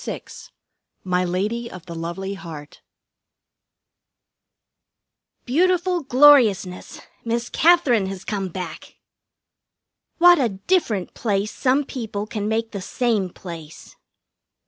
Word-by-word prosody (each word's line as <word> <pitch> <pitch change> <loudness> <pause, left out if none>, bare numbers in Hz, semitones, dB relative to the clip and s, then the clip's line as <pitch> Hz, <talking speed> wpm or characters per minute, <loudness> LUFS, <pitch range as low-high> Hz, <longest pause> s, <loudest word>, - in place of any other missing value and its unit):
VI - - -5 0.8
"MY 180 -1 0
LADY 210 +7 -2
OF 185 -1 -11
THE 170 - -8
LOVELY 170 +4 -5
HEART" 160 -6 -10 2.6
Beautiful 355 +5 +1
gloriousness! 250 -9 +4 0.2
Miss 235 +1 -2
Katherine 290 - +4
has 190 -1 -7
come 200 -2 -2
back! 175 -2 -8 1.2
What 350 -1 +7
a 250 -4 +2 0.2
different 230 - 0
place 205 -2 -1
some 265 +3 +1
people 220 -6 -5
can 210 -2 -4
make 225 +1 -1
the 200 - -5
same 215 -2 -1
place! 165 -3 -11
210 Hz, 100 wpm, -22 LUFS, 185-255 Hz, 2.6 s, What